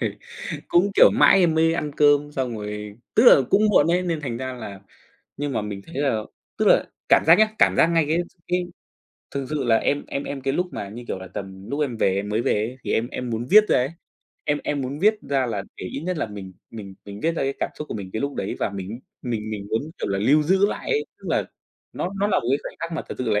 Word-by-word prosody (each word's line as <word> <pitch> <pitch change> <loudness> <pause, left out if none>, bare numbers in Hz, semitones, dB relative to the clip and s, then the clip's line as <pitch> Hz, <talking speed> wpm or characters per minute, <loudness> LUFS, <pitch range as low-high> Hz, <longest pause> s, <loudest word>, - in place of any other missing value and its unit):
rồi - - -2 0.5
cũng, 185 +4 +3
kiểu, - - +8
mãi 195 - +6
em 165 -3 +3
mới 165 +1 +3
ăn 150 -3 -2
cơm 145 0 +4
xong 125 -5 -2
rồi, 105 0 -6 0.2
tức 225 - +5
là 145 - +9
cũng 205 - +4
muộn 155 -6 +5
ấy, 180 +1 +2
nên 170 -4 -2
thành 125 -5 -4
ra 130 +1 -4
là 105 -6 -8 0.6
nhưng 145 -1 -2
mà - - 0
mình 100 -1 -5
thấy 165 - -12
là 135 -7 +1 0.4
tức - - +1
là - - +5 0.2
cảm - - +6
giác 165 +3 +8
nhá, 215 0 +5
cảm - - +5
giác 165 - +5
ngay 165 -2 +2
cái 160 +2 +1 0.3
cái 180 0 +1 0.7
thực 140 -1 -4
sự 150 -3 -1
là 115 -2 +4
em 145 +5 0
em 140 - -4
em 140 -1 -5
cái 135 +1 -1
lúc 180 +5 0
mà 100 - -5
như, 120 +4 -9
kiểu - - -3
là, 95 0 -9
tầm 95 -1 -7
lúc 145 +2 -2
em 130 -6 -1
về 95 -3 +2
em 100 +1 -2
mới 110 +3 0
về - - +2
ấy 110 +5 -2
thì - - -1
em 115 +2 0
em 125 -1 -5
muốn 115 +2 -3
viết 215 +1 +8
ra - - +4
ấy. 130 +4 0 0.5
Em 145 0 +1
em 145 -1 -1
muốn 135 +3 -4
viết 215 +5 +4
ra 135 -2 +1
là 105 -4 -3
để - - -7
ít 135 - -5
nhất 180 +2 -3
là 150 - -1
mình 100 -3 -9 0.2
mình 100 -4 -9
mình 100 0 -9
viết 165 +1 +1
ra - - -1
cái 135 0 -1
cảm - - -1
xúc 150 - -6
của - - -5
mình 95 -3 -6
cái 110 - -3
lúc 140 0 -2
đấy 95 - -3
và - - 0
mình 100 +4 -6 0.2
mình 110 -3 -3
mình 100 -2 -5
muốn, 110 - +1 0.2
kiểu - - -3
là, 100 0 -1
lưu 145 +9 +4
giữ 190 +5 +3
lại 210 - -4
ấy, 440 -1 +1
tức - - -12
là - - +1 0.5
nó 180 - -3
nó 205 - +3
là 210 - +2
một 115 - -7
cái 140 - +3
khoảnh - - -8
khắc 165 0 -4
mà 160 - -3
thật - - -5
sự 125 -3 -1
là 105 0 +2
130 Hz, 275 wpm, -23 LUFS, 105-160 Hz, 0.7 s, là